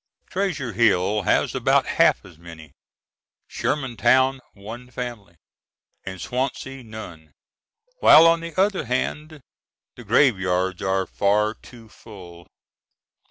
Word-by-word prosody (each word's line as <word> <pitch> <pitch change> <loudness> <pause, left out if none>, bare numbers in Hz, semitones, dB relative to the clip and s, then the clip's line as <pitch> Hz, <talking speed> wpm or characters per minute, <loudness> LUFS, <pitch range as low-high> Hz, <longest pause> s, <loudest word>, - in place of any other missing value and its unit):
Treasure 170 - -2
Hill 105 -2 +2
has - - +1
about - - +2
half - - +2
as 80 - -16
many, 80 -3 -13 0.8
Shermantown 130 0 +1 0.2
one 115 +5 -10
family, 115 -8 -7 0.7
and 95 -1 -8
Swansea 130 +3 -4
none, 85 -9 -11 0.7
while 160 - +8
on 165 0 +4
the 170 +1 -7
other 195 -4 +1
hand 150 +5 -3 0.5
the 120 - -12
graveyards 95 -6 +1
are 95 0 0
far 105 +3 0
too 115 -1 -16
full. 90 -6 -14
115 Hz, 110 wpm, -22 LUFS, 95-130 Hz, 0.8 s, while